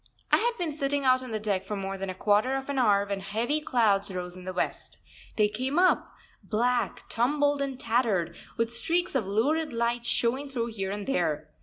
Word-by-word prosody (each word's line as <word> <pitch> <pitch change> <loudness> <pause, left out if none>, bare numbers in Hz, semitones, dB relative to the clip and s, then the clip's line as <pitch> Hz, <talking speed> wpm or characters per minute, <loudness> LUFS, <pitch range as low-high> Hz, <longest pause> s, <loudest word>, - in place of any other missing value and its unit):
I - - +7
had 480 +1 +1
been 335 -5 -2
sitting 285 -1 0
out 255 0 +5
on 255 - -7
the 220 -1 -2
deck 200 -3 -1
for 210 +2 -4
more 195 0 -3
than 195 0 -4
a 185 - -4
quarter 210 +7 +2
of 270 +1 -4
an 280 -1 0
hour 200 -4 +4
when 200 -1 -3
heavy 225 +10 -1
clouds 205 -8 +2
rose 180 -1 -5
in 185 0 -11
the 185 - -3
west. 180 - -3 0.4
They 210 -1 +4
came 255 +8 -2
up, 365 +1 +3 0.3
black, 240 +2 0
tumbled, 285 +4 +1
and 270 -2 -3
tattered, 220 - +1 0.2
with 230 0 0
streaks 345 +8 0
of 245 -8 0
lurid 290 +10 +1
light 235 +1 -1
showing 260 +5 0
through 235 -3 -2
here 195 -3 -3
and 205 0 -4
there. 155 - -1
235 Hz, 205 wpm, -28 LUFS, 200-270 Hz, 0.4 s, I